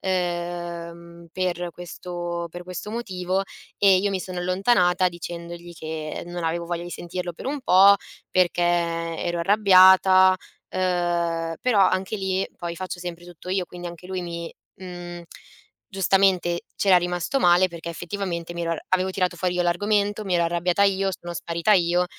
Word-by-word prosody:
ehm, 175 -2 -4
per 180 -1 -2
questo 175 0 -5
per 175 +2 -8
questo 180 +3 -7
motivo 190 -4 -2 0.4
e 195 -2 +6
io 200 +1 0
mi 190 -2 -2
sono 185 -1 -6
allontanata 185 0 +2
dicendogli 170 0 -8
che 155 -1 -5
non 175 -1 -5
avevo 170 +1 -2
voglia 170 0 -3
di 175 - -8
sentirlo 175 0 -5
per 165 - -9
un 285 +1 -2
po' 200 -4 +7 0.4
perché 180 -1 +2
ero 170 0 0
arrabbiata, 190 -1 +6 0.3
ehm, 175 -2 -1
però 240 -5 +3
anche 185 +3 -1
lì 190 -1 -1
poi 170 -1 -5
faccio 185 0 -5
sempre 175 -1 -7
tutto 175 +1 -12
io, 190 -1 0
quindi 175 +1 -8
anche 175 +1 -11
lui 185 -1 -3
mi 170 -1 -6 0.3
mhmm, 175 -1 -8 0.7
giustamente 190 -3 +2 0.2
c'era 190 -3 +5
rimasto 175 +9 -1
male 180 -2 +5
perché 170 -1 -8
effettivamente 175 -1 -4
mi 170 - -3
ero 165 0 -1
avevo 185 0 +2
tirato 185 -2 -1
fuori 180 +1 0
io 180 - +1
l'argomento, 205 +4 +1
mi 185 -3 -1
ero 170 - +3
arrabbiata 175 +3 +1
io, 195 0 +2
sono 175 0 -7
sparita 170 +5 0
io 175 -2 +3
175 Hz, 155 wpm, -24 LUFS, 170-185 Hz, 0.7 s, po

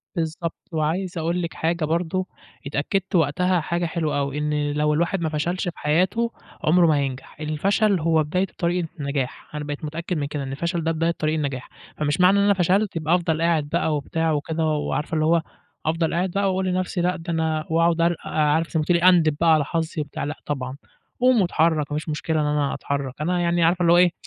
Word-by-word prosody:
بالضبط، 165 0 -4
وعايز 170 +4 -1
أقول 170 +2 -1
لِك 170 -2 -4
حاجة 165 0 -1
برضه، 170 +3 -1 0.4
اتأكدت 185 +8 -1
وقتها 175 +3 +2
حاجة 170 +2 -1
حلوة 160 -3 -1
أوي، 140 +1 -2
إن 150 -1 0
لو 150 +1 +1
الواحد 170 +4 0
ما 160 - 0
فشلش 165 +4 -1
في 175 - -5
حياته 185 +10 +1 0.3
عمره 170 +2 +5
ما 155 - +4
هينجح، 135 0 -4
الفشل 190 +6 +1
هو 160 -1 +2
بداية 180 +6 0
الطريق 175 -1 -1
للنجاح، 140 0 -4
أنا 150 - -3
بقيت 145 +1 -5
متأكد 170 +3 -3
من 145 -1 -1
كده، 145 -1 -4
إن 135 - -5
الفشل 170 +4 -2
ده 165 - +1
بداية 165 +1 +1
طريق 155 +1 0
النجاح 140 -4 -3 0.3
فمش 150 +4 0
معنى 190 +2 +6
إن - - +3
أنا 200 0 +5
فشلت 190 +2 +1
يبقى 165 +1 +2
أفضل 165 -3 0
قاعد 165 -3 +1
بقى 160 -1 +1
وبتاع 160 +3 -1
وكده، 155 +2 -1
وعارفة 155 +1 -1
اللي 155 0 +2
هو 165 +1 +3 0.4
أفضل 165 +1 0
قاعد 180 +2 0
بقى 200 +2 0
وأقول 190 0 0
لنفسي 185 0 -1
لأ 180 +1 +1
ده 170 0 -5
أنا 160 -1 0
وأقعد 165 +1 +2
أر 170 +1 +3
عارفة 155 +2 +1
زي 160 - 0
ما 155 - +1
تقولي 170 0 +3
أندِب 170 -5 +5
بقى 165 -1 +6
على 155 -2 +3
حظي 160 0 -2
وبتاع، 145 -1 -5
لأ 145 +2 -3
طبعًا، 130 -2 -4 0.4
قوم 250 -2 +4
واتحرّك، 160 -4 +1
ما 150 - -1
فيش 155 +1 -5
مشكلة 155 +1 -1
إن - - 0
أنا 150 -1 0
أتحرّك، 140 -2 -3
أنا 180 +3 0
يعني 170 0 +2
عارفة 175 +2 +3
اللي 170 -1 +5
هو 175 - +6
إيه، 180 -1 +5
165 Hz, 215 wpm, -23 LUFS, 150-175 Hz, 0.4 s, معنى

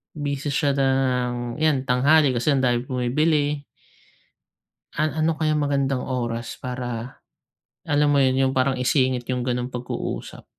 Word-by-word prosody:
busy 145 -1 -3
siya 140 0 +1
ng 125 -3 0
'yan, 150 -4 +1
tanghali 140 +2 +4
kasi 120 +6 +1
andaming 125 -3 +2
bumibili. 145 +4 0 1.3
An 155 0 +1
ano 160 +1 +2
kaya 155 0 0
magandang 140 -2 0
oras 120 -2 -3
para 125 -1 -5 0.7
alam 145 0 +2
mo 145 - +3
yun, 130 -1 +3
'yung 130 0 +2
parang 130 +1 +2
isingit 130 0 +1
'yung 125 -1 -1
ganung 125 0 -1
pag-uusap? 125 -1 -5
130 Hz, 130 wpm, -23 LUFS, 125-145 Hz, 1.3 s, tanghali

